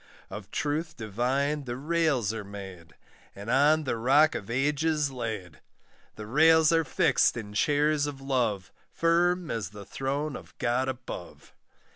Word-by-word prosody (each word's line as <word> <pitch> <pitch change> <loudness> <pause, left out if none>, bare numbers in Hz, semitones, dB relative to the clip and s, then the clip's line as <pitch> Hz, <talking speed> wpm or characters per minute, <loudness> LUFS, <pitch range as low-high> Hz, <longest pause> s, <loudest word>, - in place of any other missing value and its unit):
Of 105 -1 -8
truth 155 +5 -2
Divine 130 +7 -1
the 120 -1 -4
rails 145 -7 0
are 110 -2 -5
made, 95 -6 -10 0.4
And 100 +4 -5
on 150 +4 +4
the 130 -4 -2
Rock 140 +7 +4
of 100 - -6
Ages 145 +3 0
laid; 110 - -5 0.6
The 105 - -8
rails 160 +6 +5
are 165 0 +3
fixed 135 - +2
in 105 -3 -7
chairs 145 +5 +2
of 140 -2 -6
love, 120 -9 -1 0.2
Firm 175 +1 +1
as 110 -5 -3
the 105 -1 -11
throne 140 +2 -3
of - - -12
God 125 +2 0
above. 125 -8 -8
135 Hz, 145 wpm, -28 LUFS, 110-150 Hz, 0.6 s, rails